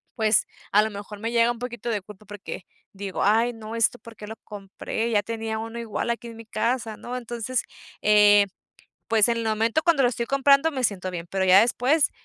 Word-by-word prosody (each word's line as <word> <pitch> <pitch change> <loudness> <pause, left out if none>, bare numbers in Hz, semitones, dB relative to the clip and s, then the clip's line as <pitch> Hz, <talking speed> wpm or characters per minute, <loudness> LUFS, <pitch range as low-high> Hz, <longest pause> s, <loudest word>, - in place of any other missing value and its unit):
pues 220 -2 +3 0.3
a 210 - +6
lo 220 - -3
mejor 205 0 -8
me 225 +2 -3
llega 235 0 +3
un 240 - -6
poquito 240 -1 -5
de 215 -3 -1
culpa 210 +2 -14
porque 205 -2 -8 0.3
digo: 195 -1 -4
"Ay, 225 +4 +3
no, 225 0 -8
esto 230 +1 +2
por 230 -1 -14
qué 210 - -10
lo 220 - -7
compré, 205 +2 -5
ya 205 -2 +2
tenía 225 -1 -4
uno 225 +1 -6
igual 230 +1 -2
aquí 235 0 -5
en 230 - -9
mi 230 - -11
casa", 225 -1 -2
¿no? 250 +1 -6
Entonces, 240 0 -3 0.4
eh, 205 -1 +6 0.6
pues 225 0 +3
en 235 - +1
el 230 - -3
momento 225 +6 +1
cuando 335 -6 +4
lo 245 - +4
estoy 235 -1 -3
comprando 275 +4 +4
me 265 -3 -3
siento 190 -5 -1
bien, 170 -1 -5
pero 190 -1 0
ya 185 +1 +7
después, 260 +6 +2
225 Hz, 215 wpm, -25 LUFS, 210-240 Hz, 0.6 s, ya